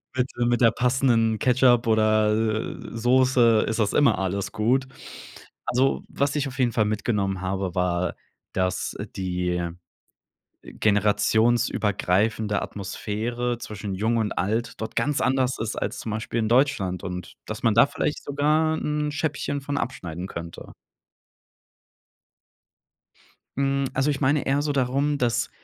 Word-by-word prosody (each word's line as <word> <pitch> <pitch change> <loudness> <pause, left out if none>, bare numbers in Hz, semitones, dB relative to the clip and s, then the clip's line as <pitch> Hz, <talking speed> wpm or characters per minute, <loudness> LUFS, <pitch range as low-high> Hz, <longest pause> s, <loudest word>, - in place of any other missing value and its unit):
mit, 130 0 +1
äh, 120 - +2
mit 120 +1 +1
der 115 -2 +6
passenden 120 -3 +2
Ketchup 125 -2 +4
oder, 110 -1 +3
äh, 110 0 -1 0.2
Soße 120 -2 +4
ist 110 - -2
das 105 -2 +1
immer 125 -8 +4
alles 95 +1 -2
gut. 130 +5 +1 0.8
Also, 130 +2 +1
was 140 +1 -1
ich 145 -2 0
auf 130 - -8
jeden 120 -2 +3
Fall 110 -1 +1
mitgenommen 100 -3 -1
habe, 95 0 -3
war, 90 -1 0 0.4
dass 95 0 -1 0.2
die, 90 -1 -2
äh, 85 -1 -2 0.9
generationsübergreifende 105 0 +1
Atmosphäre 115 +4 -3
zwischen 105 -3 -6
Jung 110 +5 0
und 110 -2 0
Alt 110 +5 -2
dort 110 - -5
ganz 140 +5 +1
anders 130 -1 +1
ist 110 0 -3
als - - -3
zum 110 - -5
Beispiel 110 +2 -2
in 110 - 0
Deutschland 115 - +1
und 90 0 -6
dass - - -6
man 115 - +3
da 115 - +6
vielleicht 150 - -3
sogar 155 +3 +1
'n 150 -1 -2
Scheibchen 145 -2 -2
von 145 +1 -3
abschneiden 90 -7 -5
könnte. 85 -2 -8 2.8
Mhm, 140 0 +1
also, 135 +2 +1
ich 140 - -3
meine 140 +2 +2
eher 140 +2 +1
so 145 0 -1
darum, 140 +3 +1
dass 120 -4 0
115 Hz, 140 wpm, -24 LUFS, 105-130 Hz, 2.8 s, der